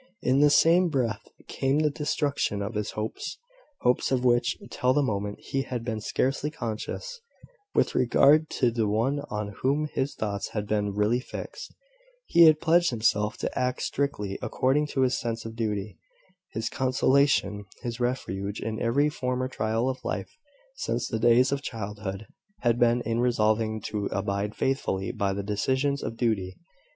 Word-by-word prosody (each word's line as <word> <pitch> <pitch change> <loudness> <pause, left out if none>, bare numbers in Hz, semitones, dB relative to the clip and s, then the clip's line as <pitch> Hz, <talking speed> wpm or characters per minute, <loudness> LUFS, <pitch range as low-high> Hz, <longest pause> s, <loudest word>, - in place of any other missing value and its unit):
In 130 +2 +3
the 145 0 +6
same 170 +4 +5
breath 120 -8 -1 0.3
came 135 +2 0
the 150 -1 +2
destruction 145 -8 -1
of 105 - -4
his 105 -1 -2
hopes, 110 +1 -4 0.4
hopes, 125 +2 +2
of 130 -1 +1
which, 120 -1 +3
till 125 +1 +2
the 145 +1 +2
moment, 105 -4 -2
he 135 - -2
had 125 -3 -4
been 110 -3 -3
scarcely 135 +7 0
conscious, 155 - -5 0.5
with - - +2
regard 145 +5 +4
to 125 -3 +1
the 115 -2 0
one 115 +7 +1
on 105 -1 -4
whom 145 +4 +1
his 135 +2 -1
thoughts 100 -2 -3
had 105 -2 -2
been 105 -1 -1
really 105 +4 +2
fixed. - - -8 0.5
He 170 0 +6
had 155 -1 +6
pledged 170 +1 +4
himself 110 -3 +1
to - - -3
act 125 0 -1
strictly 105 -9 -2
according 145 +3 +1
to 135 - -1
his 130 -1 +2
sense 115 -1 -3
of 115 0 -7
duty. 105 -3 -3 0.5
His 110 +1 -3
consolation, 130 -5 +2 0.2
his 120 0 -4
refuge 100 -5 -2
in 110 -1 -4
every 135 +6 +3
former 130 -3 -2
trial 115 -1 -1
of 130 -1 -3
life, - - -4 0.4
since 120 - -2
the 110 - -2
days 120 +3 +5
of 140 0 -1
childhood, 105 -4 -5 0.4
had 120 -1 +2
been 120 0 +4
in 115 0 -1
resolving 110 -2 +1
to 105 0 -3
abide 100 +1 -2
faithfully 95 -8 -1
by 100 -1 -1
the 100 +1 -3
decisions 130 +7 0
of 115 - -5
duty. 100 -6 -1
120 Hz, 165 wpm, -27 LUFS, 105-135 Hz, 0.5 s, the